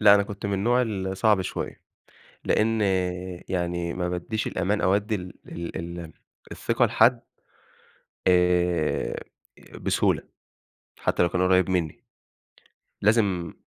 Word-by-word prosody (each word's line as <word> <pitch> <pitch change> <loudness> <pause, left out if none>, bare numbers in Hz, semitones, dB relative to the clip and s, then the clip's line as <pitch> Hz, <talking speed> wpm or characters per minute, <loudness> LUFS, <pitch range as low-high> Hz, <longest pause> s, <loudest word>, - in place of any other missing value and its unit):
لأ 105 -1 +8
أنا 100 - +4
كنت 100 0 -6
من 100 - -2
النوع 120 +6 +2
الصعب 95 -2 +1
شويّة، 95 - -5 0.7
لأن 110 0 +2 0.7
يعني 85 -1 -1
ما 90 -1 -2
بادّيش 90 +5 -2
الأمان 95 +3 0
أو 95 - +3
أدّي 105 +2 -1
ال 90 -2 -7
ال 85 0 -6
ال 85 -1 -7 0.4
الثقة - - +1
لحد - - +4 1.1
آآ 90 -2 +2 0.7
بسهولة - - +1 0.8
حتّى - - +1
لو 85 - +2
كان 90 - 0
قريب 90 0 +3
مِنّي، 85 -5 -1 1.0
لازم 100 -5 +2
95 Hz, 120 wpm, -25 LUFS, 90-105 Hz, 1.1 s, لأ